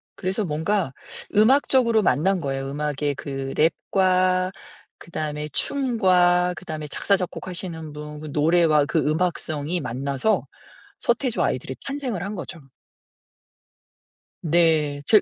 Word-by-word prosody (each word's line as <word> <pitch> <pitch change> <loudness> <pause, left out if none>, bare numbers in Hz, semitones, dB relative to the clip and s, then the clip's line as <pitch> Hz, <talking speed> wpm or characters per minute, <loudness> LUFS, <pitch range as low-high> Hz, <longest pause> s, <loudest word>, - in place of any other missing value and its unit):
그래서 190 +3 -2
뭔가 160 0 -1 0.4
음악적으로 235 0 +4
만난 185 +1 +2
거예요. 135 -2 -2
음악의 145 0 -1
그 135 -1 -5
랩과 185 +3 +2 0.5
그다음에 150 -2 -4
춤과 180 - +2
그다음에 155 -3 -6
작사 200 +7 +1
작곡하시는 175 -3 -5
분 150 0 -8
그 155 - -7
노래와 155 -1 +4
그 165 - -1
음악성이 155 0 -1
만나서 140 - -1 0.5
서태지와 240 0 +1
아이들이 130 0 -4
탄생을 265 -10 -3
한 200 - -4
거죠. 180 -2 -7 1.8
네. 160 -3 +2
제 215 -2 +7
170 Hz, 265 characters per minute, -23 LUFS, 150-190 Hz, 1.8 s, 제